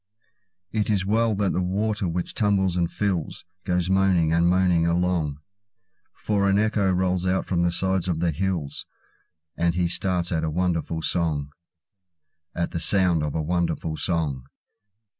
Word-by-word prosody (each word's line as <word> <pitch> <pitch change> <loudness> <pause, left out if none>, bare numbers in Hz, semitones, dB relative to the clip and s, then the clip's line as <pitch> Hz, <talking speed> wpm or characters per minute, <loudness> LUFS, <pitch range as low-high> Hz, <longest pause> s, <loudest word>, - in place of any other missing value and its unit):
It 110 -1 -1
is 100 -3 +1
well 110 +2 +2
that 100 -1 0
the 90 - 0
water 100 +2 -1
which 85 +1 -3
tumbles 100 -4 +1
and 85 -2 0
fills, 95 -7 -2 0.2
Goes 90 -1 0
moaning 95 -4 +3
and 85 +1 +3
moaning 90 -2 +3
along; 85 -4 0 0.8
For 100 -2 0
an 100 - +3
echo 105 -2 +1
rolls 90 0 0
out 95 +1 +1
from 85 -2 0
the 85 0 +2
sides 95 0 0
of 85 -3 -1
the 85 0 +1
hills, 85 -3 -2 0.7
And 85 0 +1
he 90 -1 +1
starts 90 0 -1
at 80 -2 0
a 80 - 0
wonderful 85 -1 -1
song—At 80 +1 -5
the 85 - -3
sounds 85 -1 +3
of 75 0 -3
a 80 - -1
wonderful 85 -1 -1
song. 75 -7 -2
90 Hz, 155 wpm, -24 LUFS, 85-95 Hz, 0.8 s, moaning